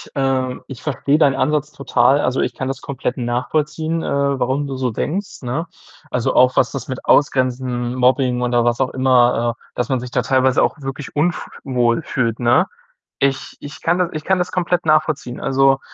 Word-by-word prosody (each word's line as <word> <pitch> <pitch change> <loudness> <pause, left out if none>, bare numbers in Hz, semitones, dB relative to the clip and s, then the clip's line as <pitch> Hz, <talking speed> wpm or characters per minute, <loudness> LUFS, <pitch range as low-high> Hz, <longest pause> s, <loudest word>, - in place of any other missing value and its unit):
ähm 130 -2 0
ich 135 -4 -9
verstehe 145 0 +1
deinen 140 -4 +3
Ansatz 150 0 0
total. 135 +1 +2
Also, 130 - 0
ich - - -1
kann 130 - -4
das 135 0 -4
komplett 130 -2 -4
nachvollziehen, 150 +7 -1
äh, 140 -1 0
warum 135 +3 0
du 135 -1 -5
so 130 -2 -1
denkst, 180 - -4
ne? 135 +7 -3 0.4
Also, 125 - 0
auch 125 0 +5
was 125 - +3
das 135 -4 -6
mit 130 -1 -5
Ausgrenzen, 125 -3 +1
Mobbing 125 -1 +2
oder 120 -1 +2
was 120 +1 +1
auch 130 - 0
immer 120 -2 +3
äh, - - -45 0.2
dass 125 - -2
man 130 -2 +1
sich 125 0 -8
da - - +1
teilweise 130 -1 +2
auch 155 - -1
wirklich 135 +2 -6
unf 170 +4 0 0.2
wohl 125 +2 +1
fühlt, 115 -6 -1
ne? 120 -1 +3 0.5
Ich 140 -1 -1
ich 145 +1 -10
kann 170 +2 +1
das 180 -1 +1
ich 155 0 -5
kann 190 -1 +2
das 180 - -2
komplett 180 -2 0
nachvollziehen. 155 -5 +1
Also, 135 0 +3
135 Hz, 190 wpm, -19 LUFS, 125-145 Hz, 0.5 s, auch